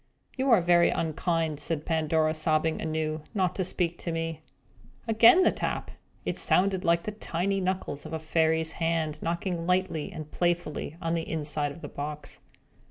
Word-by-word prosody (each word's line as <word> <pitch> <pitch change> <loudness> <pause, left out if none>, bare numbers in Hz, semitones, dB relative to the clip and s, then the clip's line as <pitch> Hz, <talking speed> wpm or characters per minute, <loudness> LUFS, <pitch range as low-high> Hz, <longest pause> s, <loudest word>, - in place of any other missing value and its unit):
"You 265 +1 0
are 225 -7 +6
very 175 0 +5
unkind," 160 -1 -1
said 155 -1 -3
Pandora, 160 -1 +1
sobbing 155 0 +1
anew, 155 -1 -2
"not 185 -3 +1
to 190 - +1
speak 175 -1 -1
to 170 - -3
me!" 165 -1 -3 0.7
Again 230 +11 +7
the - - +5
tap! - - -3 0.3
It - - -2
sounded 190 0 +2
like 170 0 +2
the 215 - -3
tiny 195 -1 -2
knuckles 185 -6 -2
of - - -10
a 160 - -1
fairy's 160 0 +1
hand, 160 -2 -1
knocking 170 0 -2
lightly 180 -2 0
and 155 -4 -8
playfully 175 -3 -1
on 165 0 0
the 165 -1 -2
inside 150 -2 -1
of 165 - -11
the - - -6
box. 150 +1 -6
165 Hz, 165 wpm, -28 LUFS, 155-180 Hz, 0.7 s, Again